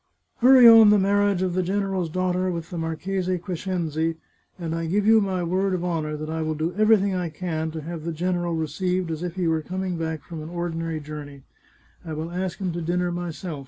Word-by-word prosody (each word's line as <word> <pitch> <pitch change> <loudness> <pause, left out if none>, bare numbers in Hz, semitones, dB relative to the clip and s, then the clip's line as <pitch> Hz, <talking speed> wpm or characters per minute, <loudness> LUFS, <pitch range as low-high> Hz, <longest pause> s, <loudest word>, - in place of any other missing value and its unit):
" - - -48
Hurry 255 0 +8
on 225 -2 +9
the 210 - +6
marriage 200 -1 +2
of 185 -2 -1
the 185 - +1
general's 190 -1 -1
daughter 185 +2 0
with 170 -2 -5
the 175 - -4
Marchese 180 +3 -2
Crescenzi, 165 -3 -2 0.4
and 165 -3 -4
I 165 0 -2
give 200 +5 +1
you 220 0 +6
my 190 -3 -1
word 185 +2 0
of 175 - -3
honour 155 -3 -2
that 155 +1 -5
I 160 +1 -3
will 155 0 -1
do 160 +3 -2
everything 210 -2 +4
I 180 -2 -2
can 160 -1 -3
to 160 0 -6
have 165 0 -6
the 170 - -3
general 175 +1 -1
received 175 +3 -1
as 160 0 -4
if 175 -1 -4
he 180 -2 0
were 160 -1 +1
coming 185 +2 -3
back 160 -2 -3
from 165 -2 -8
an 155 - -7
ordinary 165 -2 -3
journey. 145 -2 -9 0.6
I 160 - -6
will 160 +2 -4
ask 180 0 -3
him 190 -3 -2
to 175 - -4
dinner 175 +2 0
myself. 175 -2 -5
175 Hz, 220 wpm, -24 LUFS, 160-185 Hz, 0.6 s, on